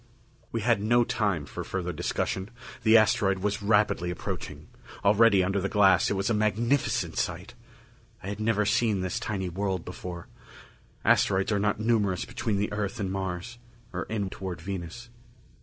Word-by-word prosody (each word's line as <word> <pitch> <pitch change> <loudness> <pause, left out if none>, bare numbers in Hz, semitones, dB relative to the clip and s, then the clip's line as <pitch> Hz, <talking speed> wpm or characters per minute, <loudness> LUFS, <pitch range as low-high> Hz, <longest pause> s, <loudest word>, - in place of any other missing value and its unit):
We 115 - -2
had 115 -1 +2
no 120 +3 +4
time 100 -10 -1
for - - -6
further 90 -2 -3
discussion. 95 +5 -2 0.3
The 110 0 +6
asteroid 100 -3 +3
was 105 +2 -2
rapidly 105 -4 +2
approaching. 90 - -6 0.4
Already, 100 -1 +5
under 95 +2 0
the 100 - -1
glass, 95 -4 +4
it - - 0
was 95 +1 -1
a 115 - +2
magnificent 110 +6 0
sight. - - -3 0.7
I 95 - -5
had 105 +1 -5
never 110 -1 +1
seen 110 -2 +2
this 95 0 -2
tiny 95 -3 -3
world 95 0 -2
before 90 -1 -7 0.8
asteroids 95 +2 +3
are 105 - +2
not 105 +1 0
numerous 105 -5 +1
between 110 -3 -2
the 105 +1 -1
Earth 105 +2 -3
and 95 -2 -2
Mars, 95 +4 -4 0.3
or 90 - -3
in 100 -4 -3
toward 90 -3 -6
Venus. 95 +6 -6
100 Hz, 160 wpm, -27 LUFS, 95-110 Hz, 0.8 s, The